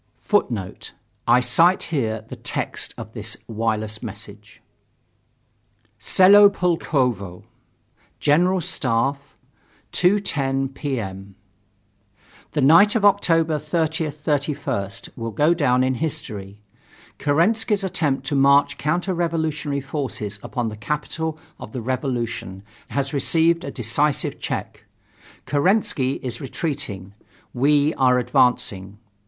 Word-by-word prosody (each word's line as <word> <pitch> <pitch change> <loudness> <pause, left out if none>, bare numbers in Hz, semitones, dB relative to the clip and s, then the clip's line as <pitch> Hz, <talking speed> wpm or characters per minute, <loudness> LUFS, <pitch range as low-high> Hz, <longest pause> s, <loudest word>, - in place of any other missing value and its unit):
[Footnote: 115 - -1 0.3
I 120 +1 +5
cite 165 +9 +3
here 110 -6 -1
the - - -8
text - - -3
of - - -9
this - - -3
wireless 110 -1 -2
message: - - -9 1.4
"Selo 200 +2 +7
Pulkovo. 130 - -1 0.8
General 180 +5 +3
Staff 140 -4 -1 0.6
2:10 140 -9 +1
P. 135 -3 -3
M. 95 -1 -7 1.2
The 150 - 0
night 170 - +6
of 215 -3 +2
October 165 -6 +3
30th 160 0 -1
31st 140 -10 -2
will 115 -1 -4
go 150 +9 +3
down 130 -6 +2
in 130 0 +1
history. 105 -9 -5 0.6
Kerensky's 200 +8 +2
attempt 145 -8 -1
to 145 +1 -1
march 140 +1 +4
counter 175 +5 0
revolutionary 160 -4 -1
forces 130 -8 -4
upon 120 -3 -3
the 105 - -7
capital 150 +6 -3 0.2
of 110 - -10
the 125 - -4
revolution 120 -6 -3 0.2
has 140 0 -2
received 165 +4 +2
a - - -5
decisive 135 +5 -1
check. - - -5 0.6
Kerensky 145 -4 +1
is 125 +3 -4
retreating, 135 - -5 0.4
we 145 +4 +3
are 125 -1 +4
advancing. 110 -5 +1
140 Hz, 105 wpm, -22 LUFS, 120-160 Hz, 1.4 s, Selo